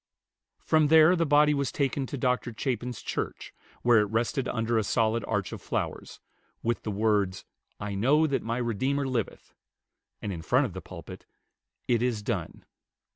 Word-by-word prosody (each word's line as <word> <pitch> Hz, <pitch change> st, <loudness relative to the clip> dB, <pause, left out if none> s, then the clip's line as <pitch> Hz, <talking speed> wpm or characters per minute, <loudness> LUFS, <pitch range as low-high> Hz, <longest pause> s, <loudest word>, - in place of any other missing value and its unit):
From 155 Hz, -1 st, +2 dB
there 160 Hz, +3 st, +7 dB
the 165 Hz, -2 st, +1 dB
body 150 Hz, +1 st, +5 dB
was 140 Hz, -2 st, -1 dB
taken 135 Hz, -1 st, -1 dB
to 140 Hz, -, -5 dB
Dr. 125 Hz, -1 st, 0 dB
Chapin's 125 Hz, -2 st, -3 dB
church, -, -, -4 dB, 0.3 s
where 120 Hz, -2 st, +6 dB
it 105 Hz, -, +3 dB
rested 120 Hz, +4 st, 0 dB
under 115 Hz, 0 st, 0 dB
a -, -, 0 dB
solid 110 Hz, +2 st, +1 dB
arch 105 Hz, -3 st, -1 dB
of -, -, -7 dB
flowers, -, -, -4 dB, 0.4 s
with 120 Hz, +1 st, 0 dB
the -, -, -5 dB
words, 100 Hz, -3 st, 0 dB, 0.3 s
"I 105 Hz, -1 st, -4 dB
know 135 Hz, +11 st, +3 dB
that 140 Hz, -3 st, 0 dB
my 115 Hz, +1 st, -2 dB
Redeemer 130 Hz, +4 st, 0 dB
liveth"; 125 Hz, -5 st, -3 dB, 0.7 s
and 100 Hz, -, -4 dB
in 85 Hz, -, -6 dB
front 125 Hz, -, +2 dB
of 105 Hz, -, -5 dB
the 95 Hz, -, -6 dB
pulpit, 90 Hz, +1 st, -10 dB, 0.6 s
"It 120 Hz, -2 st, +2 dB
is 120 Hz, -4 st, -1 dB
done." 95 Hz, -7 st, -4 dB
120 Hz, 170 wpm, -28 LUFS, 105-135 Hz, 0.7 s, there